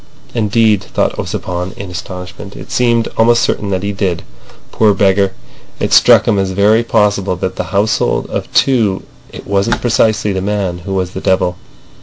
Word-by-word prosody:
Indeed, 110 -2 +2
thought - - -1
Ossipon, 90 +1 -4
in 100 -2 -7
astonishment, 90 +2 -8
it - - -10
seemed 115 -2 +1
almost 120 +1 +4
certain 105 - -1
that 95 -1 -2
he 100 - -1
did! 95 -4 -2 0.5
Poor 105 -2 +3
beggar! 95 0 +2 0.5
It - - -1
struck - - +6
him 100 - +2
as 95 -1 -1
very 105 +4 +3
possible 100 -4 +1
that 90 - -4
of 95 - -4
that - - -1
household 100 +4 0
of - - -4
two 115 -8 +2 0.3
it - - -10
wasn't 100 +3 0
precisely 110 -3 +1
the 95 - -2
man 95 -3 -2
who 95 +3 -5
was 90 -1 -2
the 95 - -6
devil. 90 -1 +1
100 Hz, 175 wpm, -14 LUFS, 95-110 Hz, 0.5 s, struck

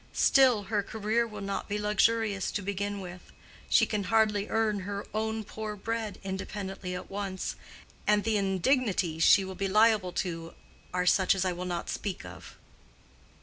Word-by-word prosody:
Still, 255 -6 +5
her 205 +1 0
career 220 +3 -1
will 210 -2 -8
not 200 0 -4
be 205 - -1
luxurious 210 -1 +1
to 205 - -2
begin 200 +1 -3
with: 180 -1 -10 0.4
she - - +5
can 205 -2 -2
hardly 210 0 +2
earn 220 -2 +1
her 200 +1 -5
own 220 0 -1
poor 215 0 -6
bread 225 +1 -3
independently 190 -1 -5
at 180 - -8
once, 195 -1 -3 0.5
and 210 0 +4
the 225 0 +1
indignities 195 - +1
she 195 - +6
will 190 - -6
be 195 +1 -2
liable 210 -2 +4
to 165 -2 -4 0.4
are 180 0 0
such 185 +1 +4
as 190 0 0
I 185 - +1
will 180 +1 -5
not 175 -1 -3
speak 195 -4 -4
of." - - -11
200 Hz, 165 wpm, -29 LUFS, 190-215 Hz, 0.5 s, she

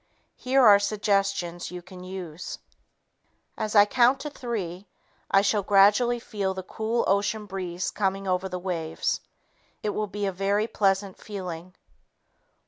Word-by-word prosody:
Here 260 0 +3
are 205 -2 +8
suggestions 195 -4 0
you 180 0 -8
can 180 0 -11
use: 180 -3 -7 1.0
"As 215 -1 -3
I 205 -1 +8
count 245 +4 +3
to 295 - -5
three, 200 -8 -5 0.4
I 195 0 +4
shall 205 0 +2
gradually 205 +5 +4
feel 200 -5 -3
the 190 - -5
cool 220 +5 -1
ocean 205 +2 +1
breeze 185 -2 -4
coming 195 -1 -1
over 185 +1 0
the 180 - -3
waves. 175 -3 -2 0.6
It 210 - 0
will 210 +1 -2
be 205 +1 -3
a 195 - 0
very 200 +3 0
pleasant 195 -3 0
feeling. 180 -4 -7
195 Hz, 140 wpm, -26 LUFS, 185-210 Hz, 1.0 s, are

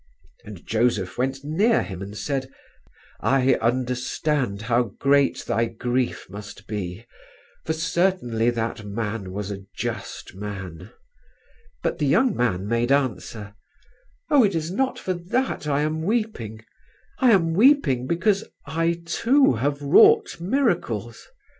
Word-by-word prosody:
And 100 -5 -11
Joseph 110 -4 0
went 135 +2 -1
near 195 +11 +2
him 95 -2 -7
and 100 +2 -7
said, 135 0 -2 0.7
'I 135 0 +3
understand 125 -1 -1
how 120 -2 0
great 140 0 +2
thy 115 0 +1
grief 120 +2 -2
must 105 +2 -10
be, 100 0 -5 0.6
for 160 - 0
certainly 160 -8 +1
that 115 -2 -3
Man 105 -1 -4
was 100 +1 -4
a 100 -1 -6
just - - -5
Man.' 95 -4 -7 0.9
But - - -1
the 150 - +1
young 230 - +3
man 100 -6 0
made 115 +3 0
answer, 115 -6 -1 0.8
'Oh, 285 -4 +6
it 200 -4 +2
is 160 +1 -2
not 260 +7 0
for 185 - -2
that 180 - -2
I 145 0 +1
am 155 +1 -1
weeping. 160 - -2 0.5
I 255 - +5
am 170 -7 +4
weeping 175 - +4
because 195 +6 +1 0.2
I 165 +1 -1
too 250 - +3
have 140 +5 -1
wrought 420 - +5
miracles. 175 - -1
130 Hz, 130 wpm, -24 LUFS, 110-170 Hz, 0.9 s, Oh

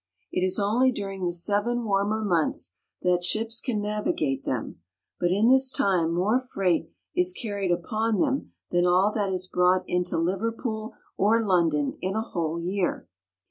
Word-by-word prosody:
It 180 - 0
is 185 0 +2
only^ 230 +6 +3
during 195 -4 -5
the 175 - 0
seven 205 +7 0
warmer 205 +1 0
months 170 -5 +1
AWhaleback. - - -32
that 175 0 +1
ships 225 +5 0
can 240 -6 -1
navigate 180 -10 -1
them; 115 -8 -4 0.4
but 175 - +1
in 205 +5 +3
this 265 +1 +6
time 180 -9 +1
more 210 +8 +2
freight 195 -9 -1 0.3
is 360 0 +2
carried 200 - -3
upon 215 +6 0
them 275 -3 0 0.2
than 175 0 +3
all 185 +4 +4
that 205 -3 -1
is 185 -1 -2
brought 180 0 +2
into 180 -1 -1
Liverpool 220 +5 -2 0.2
or 225 +3 +3
London 165 -7 +1
in 190 +2 -2
a 220 - +1
whole 170 -5 -3
year. 180 +2 -2
195 Hz, 165 wpm, -26 LUFS, 175-220 Hz, 0.4 s, this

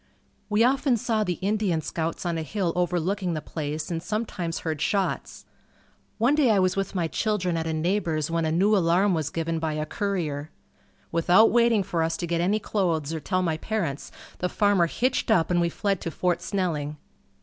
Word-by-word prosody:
We 210 +2 +3
often 265 0 +3
saw 220 0 0
the 180 -4 -2
Indian 200 -4 +1
scouts 160 +3 -3
on 170 -1 0
a 165 - -2
hill 175 +1 -2
overlooking 180 +1 0
the - - -1
place 155 +1 -4
and 165 -1 -2
sometimes 190 -5 -3
heard 155 -3 -3
shots. 195 -2 -1 0.7
One 235 +6 +3
day 295 -5 +3
I 215 - +4
was 185 -1 +2
with 195 0 -2
my 170 -3 +1
children 185 -2 -1
at 165 0 -2
a 160 - -1
neighbor's 160 -2 0
when 165 0 0
a 160 - 0
new 195 +6 +3
alarm 185 +2 +3
was 155 -4 -1
given 165 0 -2
by 160 -1 -1
a 155 0 -2
courier. 160 -6 -2 0.6
Without 175 +6 +5
waiting 235 -3 +4
for 180 -3 -2
us 165 0 0
to - - -3
get 170 0 0
any 195 +5 +2
clothes 165 -8 -1
or 160 - -2
tell 185 +3 -1
my 160 -3 0
parents, 165 -8 -3 0.3
the 180 - 0
farmer 200 -4 +3
hitched 255 +10 0
up 180 -6 +3
and 175 -1 +3
we 170 - +2
fled 195 +1 -1
to - - -3
Fort 175 +2 0
Snelling. 155 -7 -2
175 Hz, 195 wpm, -26 LUFS, 160-205 Hz, 0.7 s, Without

